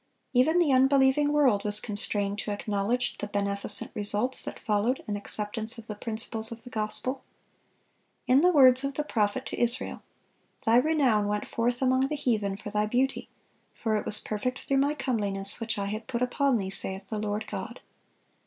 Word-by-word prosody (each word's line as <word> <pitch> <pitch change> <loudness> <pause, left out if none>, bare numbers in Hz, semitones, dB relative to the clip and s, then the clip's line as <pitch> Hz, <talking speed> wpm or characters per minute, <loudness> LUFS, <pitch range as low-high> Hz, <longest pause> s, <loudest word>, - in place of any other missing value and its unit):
Even 275 +7 +3
the 340 -5 +3
unbelieving 270 +2 +3
world 265 -9 +2
was 210 0 +7
constrained 205 -1 -3
to - - -4
acknowledge 205 +4 -2
the 205 - -4
beneficent 200 0 +2
results 210 +5 +3
that - - -4
followed 215 +5 -1
an 205 - -3
acceptance 215 +3 0
of 230 - -10
the 215 - -6
principles 220 +1 -2
of 230 0 -9
the 245 - -12
gospel. 255 +4 -3 1.0
In 260 +3 +4
the 360 +2 +4
words 260 -4 +5
of 275 0 -3
the 300 - -2
prophet 225 -1 -1
to - - -5
Israel, 240 +1 -1 0.6
"Thy 225 +1 +4
renown 255 -7 +2
went 210 0 -3
forth 245 +2 -1
among 260 +1 +2
the 300 - -3
heathen 215 -8 -1
for 205 0 -9
thy 210 0 0
beauty: 255 +4 -1 0.5
for 220 -2 -2
it 210 - -1
was 210 - 0
perfect 250 +5 -4
through 275 - 0
My 285 +2 +1
comeliness, 205 -7 -2
which 230 -2 -3
I 200 - -2
had 215 +2 -5
put 250 -1 -2
upon 260 +1 +1
thee, 190 -2 -4
saith 195 0 -2
the 215 - -3
Lord 210 +1 -3
God." 215 +4 -7
225 Hz, 180 wpm, -27 LUFS, 205-260 Hz, 1.0 s, was